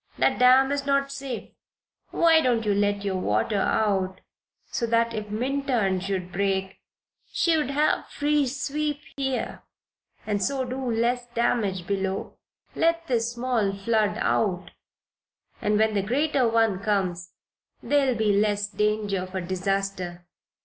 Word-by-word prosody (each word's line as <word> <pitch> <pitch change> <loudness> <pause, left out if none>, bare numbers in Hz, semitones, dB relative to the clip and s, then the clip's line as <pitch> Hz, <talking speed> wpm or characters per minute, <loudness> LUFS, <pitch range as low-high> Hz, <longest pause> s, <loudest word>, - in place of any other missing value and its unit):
That - - +2
dam 260 +2 +6
is 285 0 -1
not 275 0 +1
safe. 275 -4 -6 0.6
Why 325 -1 +4
don't 240 -5 +1
you 205 - +2
let 205 0 0
your 190 -2 -1
water 145 - 0
out 190 -3 0 0.5
so 235 - -1
that, 230 0 +2
if 215 -1 -5
Minturn 240 -4 0
should 185 -1 -3
break, 190 +1 -1 0.5
she'd 315 -5 +1
have 295 +2 +1
free 295 -1 +1
sweep 290 +2 -2 0.2
here 265 -2 -3 0.6
and 205 -2 -1
so 265 +4 0
do 260 +2 -4
less 240 +2 0
damage 230 -6 0
below? 195 0 -2 0.4
Let 335 0 +1
this 235 -5 0
small 235 -5 0
flood 210 +1 0
out 180 -4 0 0.9
and 210 0 +2
when 220 0 +2
the 200 - +1
greater 265 +4 +1
one 225 -4 +2
comes 185 -4 -1 0.5
there'll 275 -3 +2
be 215 -2 +2
less 205 0 +1
danger 210 -2 -1
of 185 +1 -8
a 190 - -1
disaster." 185 -1 -3
220 Hz, 135 wpm, -25 LUFS, 195-265 Hz, 0.9 s, dam